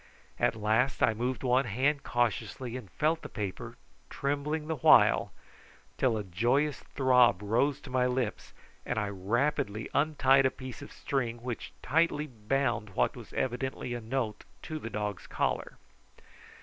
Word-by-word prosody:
At - - +2
last 110 +5 +1
I 110 - +4
moved 125 +3 -2
one 130 +1 +3
hand 135 +6 +1
cautiously 120 0 -1
and 120 -7 -7
felt 160 +2 0
the - - -8
paper, 100 -4 -5 0.3
trembling 145 +2 -2
the 160 0 -2
while, - - +5 0.7
till 120 -4 +2
a 105 - -3
joyous 120 - +1
throb 125 -7 +3
rose 120 +7 +1
to 130 - -10
my 125 0 +2
lips, 125 -3 -2 0.3
and - - -3
I 105 -2 0
rapidly 105 +2 -1
untied 140 -3 +4
a - - +1
piece 130 -2 -9
of - - -10
string 120 -4 -3
which 125 -2 -5
tightly 155 0 +2
bound 120 -4 -2
what - - +1
was - - -11
evidently 130 0 -2
a 120 - -4
note 115 -2 -3 0.2
to 155 -1 -5
the 115 - -6
dog's 105 -4 -4
collar. - - -2
125 Hz, 150 wpm, -30 LUFS, 110-135 Hz, 0.7 s, while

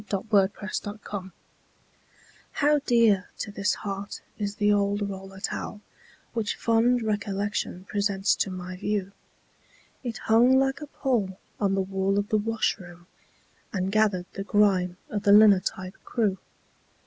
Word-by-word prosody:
THE 200 - +1
OLD 190 - -11
ROLLER 205 +1 0
TOWEL 190 -2 -6 1.2
How 295 0 +3
dear 225 -5 +4
to 210 - -5
this 200 +1 0
heart 200 -1 -5 0.2
is 205 -1 -2
the 205 0 +3
old 205 0 +1
roller 195 -1 -8
towel 210 +1 -4 0.5
Which 225 -3 -1
fond 235 +1 +2
recollection 205 -3 -2
presents 200 -1 +1
to - - 0
my 185 0 -6
view. 205 -1 -2 0.9
It 235 -3 -4
hung 240 +4 +4
like 270 +2 +1
a 300 - -6
pall 225 -10 -1 0.2
on 195 -2 +2
the 195 - +1
wall 195 +1 0
of 205 0 -1
the 215 - +2
washroom, 190 -5 -2 0.7
And 190 -1 -1
gathered 205 -4 +2
the 195 - -4
grime 195 -4 +2
of 205 - -1
the 200 - +3
linotype 200 -2 +4
crew. 210 -5 0
205 Hz, 140 wpm, -26 LUFS, 195-220 Hz, 1.2 s, dear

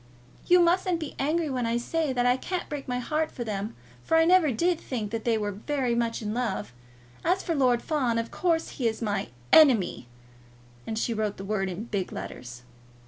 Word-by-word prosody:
"You 360 0 +6
mustn't 350 0 +2
be 310 -3 -5
angry 310 +4 +1
when 255 -4 -1
I 230 +1 +1
say 310 +4 -1
that 245 -1 0
I 245 0 +4
can't 360 +7 -4
break 290 -2 -6
my 250 -1 -1
heart 305 +5 -1
for 245 - -5
them, 210 -1 -4 0.3
for 325 - +2
I 325 - +5
never 350 -4 +5
did 340 +8 +1
think 220 -6 -4
that 225 -1 -4
they 230 -2 +2
were 205 -1 -2
very 250 +4 -1
much 235 -1 -1
in 210 0 -2
love. 120 - -2 0.5
As 365 +3 +1
for 335 - -1
Lord 250 -5 +2
Fawn, 260 -7 0
of 230 0 -2
course 330 -2 0
he 245 - -1
is 220 -1 -2
my 205 -3 -1 0.3
ENEMY!" 235 - +5 0.8
And 220 - -3
she 230 +1 0
wrote 215 -2 -2
the 195 - -7
word 195 -2 -1
in 185 +4 -5
big 205 -5 -3
letters. 120 0 -8
245 Hz, 205 wpm, -27 LUFS, 215-315 Hz, 0.8 s, You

